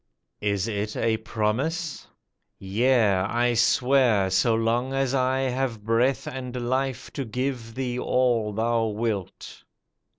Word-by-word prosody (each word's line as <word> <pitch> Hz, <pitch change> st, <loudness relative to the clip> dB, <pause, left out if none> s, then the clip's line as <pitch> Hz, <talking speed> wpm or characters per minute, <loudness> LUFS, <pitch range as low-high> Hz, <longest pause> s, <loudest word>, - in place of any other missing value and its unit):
"Is 100 Hz, 0 st, 0 dB
it 105 Hz, -1 st, -3 dB
a 115 Hz, -1 st, +1 dB
promise?" 130 Hz, +10 st, -2 dB, 0.5 s
"Yea, 110 Hz, +1 st, +2 dB
I 120 Hz, +6 st, +1 dB
swear 120 Hz, -5 st, +3 dB
So 110 Hz, +5 st, +3 dB
long 120 Hz, +4 st, 0 dB
as 135 Hz, -1 st, 0 dB
I 130 Hz, 0 st, +1 dB
have 130 Hz, -4 st, -2 dB
breath 115 Hz, +5 st, +1 dB
and 125 Hz, -1 st, -5 dB
life 130 Hz, 0 st, -2 dB
To 140 Hz, -, -3 dB
give 125 Hz, -1 st, -4 dB
thee 125 Hz, -2 st, -2 dB
all 120 Hz, -4 st, +1 dB
thou 115 Hz, +2 st, 0 dB
wilt." 105 Hz, -3 st, -4 dB
120 Hz, 125 wpm, -25 LUFS, 110-130 Hz, 0.5 s, swear